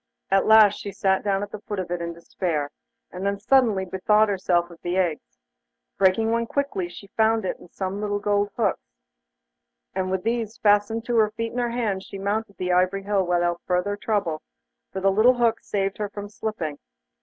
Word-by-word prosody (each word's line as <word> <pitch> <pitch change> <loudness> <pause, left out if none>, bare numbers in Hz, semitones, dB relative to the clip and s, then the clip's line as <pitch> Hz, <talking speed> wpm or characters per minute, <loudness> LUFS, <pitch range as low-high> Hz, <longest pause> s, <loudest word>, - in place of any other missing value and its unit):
At 195 0 +3
last 215 -2 +7
she 200 - -6
sat 190 -1 +1
down 200 -1 0
at 205 - -7
the 215 - -6
foot 205 -1 -5
of 185 -2 -4
it 175 -1 -2
in 170 0 -3
despair, 165 -3 -3 0.4
and 185 +1 -6
then 200 0 0
suddenly 210 -3 +3
bethought 210 +4 +2
herself 175 -3 +1
of 170 - -15
the 175 +1 -2
eggs. 175 - -1 0.6
Breaking 195 +4 +3
one 230 0 0
quickly, 275 -12 -2
she 175 - -11
found 220 -1 +2
in - - +1
it 175 - -15
some 195 +1 -3
little 205 -1 -1
gold 205 0 +1
hooks, 205 - -1 1.0
and 185 0 -1
with 190 -1 -1
these 230 -1 -2
fastened 210 +2 +2
to 240 -1 0
her 215 -1 +4
feet 230 +1 -4
and 245 - -2
hands, 215 -6 -1
she 195 - -8
mounted 200 +1 -2
the 180 0 -1
ivory 185 +2 +2
hill 200 -1 +1
without 175 -1 0
further 180 +3 0
trouble, 200 -7 -1 0.5
for 190 - -4
the 195 +1 +4
little 225 +6 +5
hooks 235 -2 +1
saved 195 0 -1
her 210 -1 -2
from 205 0 -7
slipping. 190 -9 -4
200 Hz, 195 wpm, -24 LUFS, 185-215 Hz, 1.0 s, last